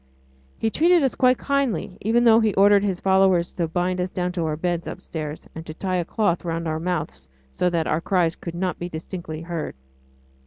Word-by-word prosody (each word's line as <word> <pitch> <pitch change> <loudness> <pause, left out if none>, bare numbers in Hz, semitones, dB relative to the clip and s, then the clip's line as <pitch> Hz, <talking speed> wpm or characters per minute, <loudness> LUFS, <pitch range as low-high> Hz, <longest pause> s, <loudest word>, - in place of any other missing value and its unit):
He 225 - 0
treated 340 +3 +4
us 265 - +2
quite 255 -1 +3
kindly, 275 -9 -1
even 230 +3 +2
though 225 -1 +7
he 220 -3 +1
ordered 200 +1 +5
his 190 -3 -1
followers 190 -2 +3
to 170 -2 -1
bind 180 +2 -1
us 180 - -1
down 180 -1 -2
to 175 -2 -2
our 155 - -1
bed 175 0 -2
upstairs, 155 -2 -6
and 160 - -7
to 155 - -7
tie 185 +1 -1
a 175 - -1
cloth 175 -3 0
round 165 -1 -3
our 155 0 -1
mouths 150 - -3 0.2
so 180 - +1
that 170 -2 0
our 155 +2 0
cries 175 -3 +1
could 170 -1 -7
not 180 -1 -2
be 175 - -4
distinctly 160 -1 -6
heard. 170 -2 -4
180 Hz, 205 wpm, -23 LUFS, 165-200 Hz, 0.2 s, though